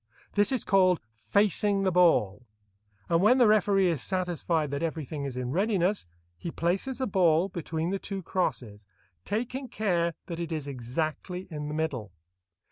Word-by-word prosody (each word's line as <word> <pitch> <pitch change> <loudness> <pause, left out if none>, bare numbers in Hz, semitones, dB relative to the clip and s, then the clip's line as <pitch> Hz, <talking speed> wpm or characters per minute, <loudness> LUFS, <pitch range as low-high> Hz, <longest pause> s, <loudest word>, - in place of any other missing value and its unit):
This 205 +2 +3
is 260 -4 0
called 185 -3 +4
"facing 195 - +2
the 190 - +2
ball," 130 - +3 0.6
and 170 0 +2
when 225 +6 +5
the 250 - +6
referee 200 -2 +4
is 165 -7 +1
satisfied 175 -5 -1
that 140 - -2
everything 155 -3 -3
is 130 -2 -5
in 125 0 -3
readiness, 195 - +1 0.3
he 170 - -4
places 190 +11 -1
the 260 - -1
ball 180 -4 +3
between 165 -1 -3
the 195 - -1
two 195 -1 -5
crosses, 110 - -3 0.4
taking 250 +5 -3
care 175 -7 0
that 170 -2 -6
it 170 -1 -4
is 155 -3 -3
exactly 155 +8 -4
in 150 -1 -4
the 150 - -4
middle. 135 - -2
170 Hz, 160 wpm, -28 LUFS, 150-195 Hz, 0.6 s, the